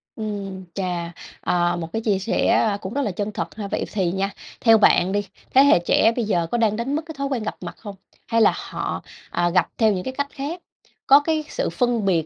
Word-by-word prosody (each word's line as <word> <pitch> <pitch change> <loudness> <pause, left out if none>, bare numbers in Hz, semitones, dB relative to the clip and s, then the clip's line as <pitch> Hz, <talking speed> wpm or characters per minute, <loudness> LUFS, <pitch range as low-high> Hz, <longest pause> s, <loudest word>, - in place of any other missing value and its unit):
Ừm, 200 -3 -5
chà, 175 -3 -3 0.3
ờ, 175 0 +1
một 165 -1 -5
cái 225 - -1
chia 205 -4 +1
sẻ, 200 +4 0
a, 210 -2 +3
cũng 195 +1 -7
rất 285 - 0
là 210 -8 -1
chân 205 +3 -3
thật - - -5
ha. 210 -2 -5
Vậy - - -2
thì 185 -5 +1
nha, 195 +1 -1 0.3
theo 225 -2 +6
bạn 190 -3 +4
đi, 205 0 -1 0.3
thế 270 - +7
hệ 280 -10 +6
trẻ 215 +6 +3
bây 240 - -1
giờ 175 -5 0
có 240 - +1
đang 220 -3 +2
đánh 240 +6 -2
mất 310 - 0
cái 320 -2 -9
thói 275 0 -1
quen 260 -5 -2
gặp - - -3
mặt - - -7
không? 205 -3 -9 0.3
Hay 230 -1 +2
là - - +5
họ, - - -4 0.3
ờ, 175 0 +1
gặp 180 -1 +2
theo 220 -2 +4
những 180 -1 -3
cái 260 - -4
cách 285 0 0
khác? 310 +5 -5 0.5
Có 275 +1 +8
cái 310 +1 -1
sự - - -2
phân 240 -4 0
biệt, 170 -5 +2
210 Hz, 245 wpm, -22 LUFS, 190-245 Hz, 0.5 s, Có